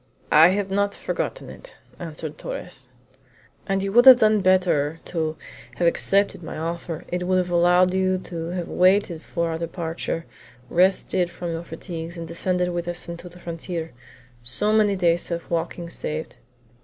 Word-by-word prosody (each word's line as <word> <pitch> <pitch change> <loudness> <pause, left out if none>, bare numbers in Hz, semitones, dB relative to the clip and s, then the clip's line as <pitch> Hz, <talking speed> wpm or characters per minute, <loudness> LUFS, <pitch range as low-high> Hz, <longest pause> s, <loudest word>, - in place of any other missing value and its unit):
"I 155 +2 +8
have 195 +1 0
not 200 +1 +1
forgotten - - -4
it," - - -13 0.2
answered 160 -2 -7
Torres. - - -5 0.8
"And 195 -1 0
you 195 - -2
would 240 +5 +6
have 260 -2 +12
done 215 -3 +4
better 175 -5 +2
to 160 -2 -2 0.4
have 175 - 0
accepted 195 +3 +2
my 160 - -7
offer; 165 +1 -4
it 180 0 -2
would 185 0 +3
have 180 -1 0
allowed 180 +1 +4
you 185 0 +2
to 170 -3 -6
have 175 0 -4
waited 185 -2 +2
for 170 0 -2
our 160 - -3
departure, 165 -1 -4 0.5
rested 185 0 +2
from 175 0 -5
you 165 0 -3
fatigues, 170 0 -7
and 165 -1 -6
descended 180 +1 -1
with 175 0 -3
us 175 0 -3
to 170 +1 -8
the 175 - -15
frontier; 170 -1 -5 0.5
so 130 - -1
many 210 -2 +3
days 175 -2 +2
of 170 -1 -4
walking 170 +1 -2
saved." 155 -4 -4
175 Hz, 165 wpm, -23 LUFS, 165-185 Hz, 0.8 s, have